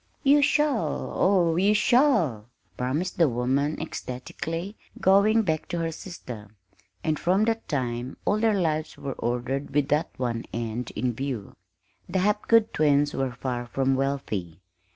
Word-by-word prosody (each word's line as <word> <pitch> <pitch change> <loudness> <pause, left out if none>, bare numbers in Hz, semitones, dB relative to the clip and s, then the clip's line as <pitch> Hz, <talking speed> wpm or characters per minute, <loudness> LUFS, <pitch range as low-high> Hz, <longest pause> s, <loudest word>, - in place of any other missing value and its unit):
"You 285 +1 +6
shall, 290 -3 +1
oh, 175 -4 +3
you 200 +3 +4
shall!" 210 - +3 0.3
promised 145 +10 -2
the 165 -4 +5
woman 130 +5 0
ecstatically, 165 - -5 0.2
going 205 +4 +4
back 160 -5 -1
to 175 - -3
her 165 -1 -1
sister; 125 - -9 0.5
and 155 -1 0
from 190 +5 +2
that 225 0 -1
time 125 -3 -3
all 210 - +2
their 215 -2 +2
lives 155 -3 -1
were 135 -1 -4
ordered 125 +4 -3
with 145 -1 +2
that 150 +2 +1
one 120 -2 -2
end 115 +1 -3
in 125 -1 0
view. 125 -4 -5 0.5
The 185 - -1
Hapgood 210 +3 +3
twins 145 -1 +3
were 135 -2 -1
far 120 -1 -4
from 135 +2 +1
wealthy. 110 - -2
145 Hz, 145 wpm, -26 LUFS, 125-190 Hz, 0.5 s, You